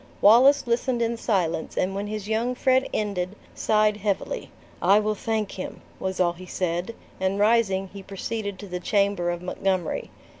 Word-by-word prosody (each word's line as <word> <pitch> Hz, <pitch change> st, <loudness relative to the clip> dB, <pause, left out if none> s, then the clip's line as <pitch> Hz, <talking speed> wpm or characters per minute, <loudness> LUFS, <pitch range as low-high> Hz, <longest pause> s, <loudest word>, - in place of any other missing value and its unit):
Wallace 260 Hz, +7 st, +6 dB
listened 240 Hz, +1 st, 0 dB
in 230 Hz, +1 st, 0 dB
silence 185 Hz, -8 st, -1 dB
and 185 Hz, +1 st, +1 dB
when 200 Hz, +1 st, -3 dB
his 210 Hz, -1 st, -5 dB
young 230 Hz, +3 st, 0 dB
friend 260 Hz, +1 st, +2 dB
ended, 200 Hz, -2 st, -2 dB, 0.2 s
sighed 215 Hz, -1 st, +2 dB
heavily, 210 Hz, -, -2 dB, 0.3 s
"I 195 Hz, +4 st, +6 dB
will 215 Hz, 0 st, 0 dB
thank 215 Hz, 0 st, -2 dB
him," 185 Hz, -, -7 dB, 0.2 s
was 190 Hz, 0 st, -3 dB
all 175 Hz, -2 st, +3 dB
he 180 Hz, +1 st, -11 dB
said; 180 Hz, +5 st, -2 dB, 0.2 s
and 190 Hz, +1 st, 0 dB
rising, 205 Hz, -3 st, +3 dB
he 200 Hz, -, -8 dB
proceeded 200 Hz, +1 st, -4 dB
to 205 Hz, -, -9 dB
the 180 Hz, -1 st, -4 dB
chamber 200 Hz, -2 st, +1 dB
of 175 Hz, 0 st, -3 dB
Montgomery. 185 Hz, -1 st, -1 dB
200 Hz, 165 wpm, -25 LUFS, 185-220 Hz, 0.3 s, Wallace